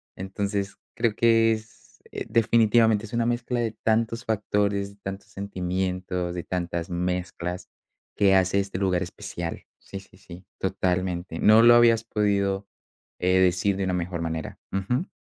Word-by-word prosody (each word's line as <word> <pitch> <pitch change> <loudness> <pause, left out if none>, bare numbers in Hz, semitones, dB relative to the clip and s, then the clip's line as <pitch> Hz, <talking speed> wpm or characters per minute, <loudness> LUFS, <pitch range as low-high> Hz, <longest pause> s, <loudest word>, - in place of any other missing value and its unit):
entonces, 100 +1 -3 0.2
creo 115 -2 0
que 115 -1 +4
es 110 0 -11
eh, - - -5
definitivamente 110 -1 +3
es 110 - -13
una 115 0 +1
mezcla 120 +1 -1
de 115 -2 0
tantos 115 +2 0
factores, 100 -2 0
de - - -18
tantos 95 0 -6
sentimientos, 90 -2 -3
de 90 -1 -4
tantas 85 -1 -3
mezclas 90 0 -3 0.5
que 95 -1 +4
hace 95 +1 +3
este 95 -1 -3
lugar 95 -2 +1
especial. 85 -1 -6
Sí, 95 - -8
sí, 95 -1 -19
sí, 90 -1 -13
totalmente. 90 -2 -2
No 110 +1 +6
lo 120 0 +8
habías 115 -1 +5
podido, 100 -3 0 0.5
eh, 90 +1 +3
decir 95 +2 +2
de 100 - -1
una 95 - -1
mejor 90 -1 -3
manera. 80 -1 -4
Ujú. 110 - -1
100 Hz, 150 wpm, -25 LUFS, 90-110 Hz, 0.5 s, lo